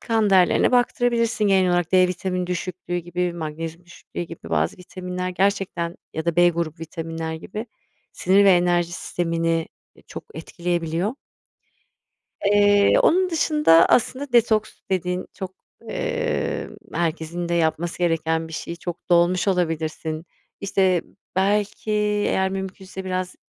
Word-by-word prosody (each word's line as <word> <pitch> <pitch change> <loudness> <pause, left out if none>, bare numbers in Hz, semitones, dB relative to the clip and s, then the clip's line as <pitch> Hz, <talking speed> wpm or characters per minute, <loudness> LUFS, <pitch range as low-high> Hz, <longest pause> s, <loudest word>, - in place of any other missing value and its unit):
kan 225 -3 +1
değerlerine 190 +5 +4
baktırabilirsin 240 -2 +2
genel 190 -2 +4
olarak. 175 -1 0
D 185 -1 +5
vitamini 180 0 -2
düşüklüğü 180 0 -4
gibi, 175 +1 -2
magnezyum 165 +1 -6
düşüklüğü 175 0 -8
gibi 170 -1 -10
bazı - - +1
vitaminler 180 0 -5
gerçekten 185 -2 -1 0.2
ya 160 - -3
da 170 0 -1
B 175 0 +6
grubu 165 -2 -3
vitaminler 165 0 -5
gibi 210 +8 -6 0.5
sinir 195 +2 +3
ve 195 - +7
enerji 175 -1 +2
sistemini, 165 -2 -1 0.3
e, - - -19
çok - - -9
etkileyebiliyor. 170 +4 -2 1.3
Eee, 205 0 +5
onun 370 +2 +4
dışında 300 - +4
aslında 260 +3 +1
detoks 220 -2 +3
dedin. 180 0 -1
Çok, 190 -2 -6 0.4
eee, - - -2 0.2
herkesin 170 +1 -2
de - - 0
yapması 165 0 0
gereken 165 -2 0
bir 160 - -11
şey. 170 - -5
Çok 175 +1 -7
dolmuş 175 +2 +3
olabilirsin. 160 -3 -1 0.4
İşte, 190 -3 +2 0.3
belki 205 +2 0 0.4
eğer 190 0 +1
mümkünse 190 0 -6
biraz 185 0 -3
180 Hz, 130 wpm, -23 LUFS, 170-195 Hz, 1.3 s, ve